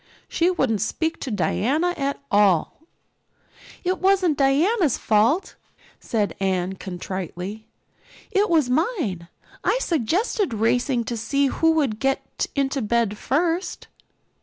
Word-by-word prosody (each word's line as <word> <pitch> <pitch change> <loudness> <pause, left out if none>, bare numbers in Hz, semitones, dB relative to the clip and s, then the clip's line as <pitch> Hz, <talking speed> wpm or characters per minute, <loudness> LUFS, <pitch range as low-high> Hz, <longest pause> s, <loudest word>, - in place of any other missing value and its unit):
She 340 +2 +1
wouldn't 265 - 0
speak 320 +9 -1
to 270 - -5
Diana 260 - +1
at 280 -1 -2
all." 200 - +3 1.0
"It 370 +1 0
wasn't 375 -4 +3
Diana's 290 - +2
fault," 230 - +2 0.5
said 210 -3 -1
Anne 190 -1 0
contritely. 190 +2 -6 0.6
"It 400 +1 +2
was 315 -6 +3
mine. 250 - -1 0.4
I - - +2
suggested 350 - 0
racing 240 +3 +1
to 235 - -4
see 275 +5 0
who 325 +4 +2
would 275 -9 0
get 270 +1 -1
into 275 -1 0
bed 225 -1 +1
first." 330 - -1
270 Hz, 115 wpm, -23 LUFS, 215-330 Hz, 1.0 s, all